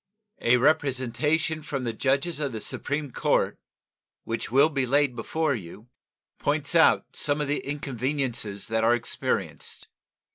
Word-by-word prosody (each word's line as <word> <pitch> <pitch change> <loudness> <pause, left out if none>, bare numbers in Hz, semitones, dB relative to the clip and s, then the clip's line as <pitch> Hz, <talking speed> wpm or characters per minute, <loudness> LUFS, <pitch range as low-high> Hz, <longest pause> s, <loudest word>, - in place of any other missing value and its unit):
A 120 +1 +4
representation 150 +3 +1
from 140 -3 -4
the 115 -2 -2
judges 140 +8 0
of 140 -4 -2
the 110 - -3
Supreme 145 +4 -3
Court, - - +1 0.6
which 115 0 -4
will 140 +5 +5
be 135 -4 -1
laid 140 -1 +2
before 155 +6 0
you, 105 +2 -8 0.5
points - - 0
out - - +4
some 145 0 +1
of 150 - -1
the 145 - 0
inconveniences 130 -6 -2
that 110 0 +1
are 120 +1 +5
experienced. 120 - -3
135 Hz, 140 wpm, -26 LUFS, 120-150 Hz, 0.6 s, will